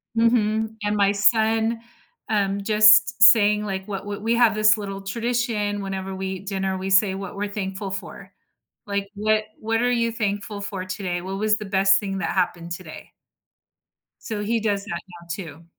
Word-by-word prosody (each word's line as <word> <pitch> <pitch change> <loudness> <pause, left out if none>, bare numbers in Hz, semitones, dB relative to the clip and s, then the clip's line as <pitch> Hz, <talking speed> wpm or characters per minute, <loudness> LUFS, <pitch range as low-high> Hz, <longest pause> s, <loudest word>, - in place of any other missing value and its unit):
Mhm, 220 -1 +1
and 210 0 0
my 200 -1 +3
son 220 +2 +2 0.5
um, 200 -2 0
just 215 +1 +5
saying, 210 -1 +6
like, 190 -1 -4
what 195 -1 -5
what 205 0 -6
we 230 +2 +1
have 235 -2 +4
this 215 +1 +4
little 195 -1 -6
tradition 220 -1 -2
whenever 195 0 -5
we 190 0 -4
eat 190 +1 -6
dinner, 190 -1 -2
we 190 +1 -4
say 190 0 +3
what 195 -1 -7
we're 205 +1 -2
thankful 195 -1 -5
for. 190 +1 -8 0.6
Like, 200 -1 -3
"What 215 +1 +1
what 225 +1 -1
are 245 - +2
you 230 -1 +1
thankful 205 -2 -3
for 195 -2 -5
today? 180 -1 -4
What 190 +2 -5
was 215 0 +2
the 210 - -7
best 195 0 +3
thing 195 -1 -4
that - - -2
happened 175 -2 -2
today?" 175 -3 -10 1.1
So, 215 -3 -4
he 230 +2 0
does 205 -2 -1
that 170 -4 -4
now 175 -2 -14
too. 165 -3 -8
205 Hz, 180 wpm, -23 LUFS, 195-215 Hz, 1.1 s, saying